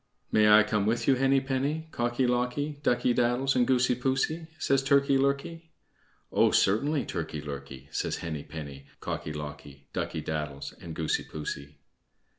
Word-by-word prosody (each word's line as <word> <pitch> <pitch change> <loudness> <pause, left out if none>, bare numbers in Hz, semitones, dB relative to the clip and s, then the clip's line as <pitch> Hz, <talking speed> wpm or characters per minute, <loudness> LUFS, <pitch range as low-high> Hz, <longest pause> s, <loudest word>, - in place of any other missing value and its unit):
"May 105 0 +5
I 105 0 +8
come 105 -1 0
with 115 +2 0
you, 135 - +6
Henny 135 +1 +3
penny, 140 +4 -1
Cocky 120 +2 0
locky, 125 +4 -1
Ducky 120 -2 +2
daddles, 125 +3 +2
and 125 -1 +3
Goosey 125 -1 +3
poosey?" 135 +6 -1
says 135 0 +2
Turkey 140 0 +3
lurkey. 140 +5 0 0.6
"Oh, - - +4
certainly, 140 +9 +2
Turkey 75 - -4
lurkey," 70 -2 -8
says - - -1
Henny 80 -3 -4
penny, 70 -3 -9
Cocky 75 - -4
locky, 75 -2 -8
Ducky - - -2
daddles, 75 -3 -4
and 80 -2 -7
Goosey 80 -1 0
poosey. 75 -1 -6
120 Hz, 150 wpm, -28 LUFS, -, 0.6 s, I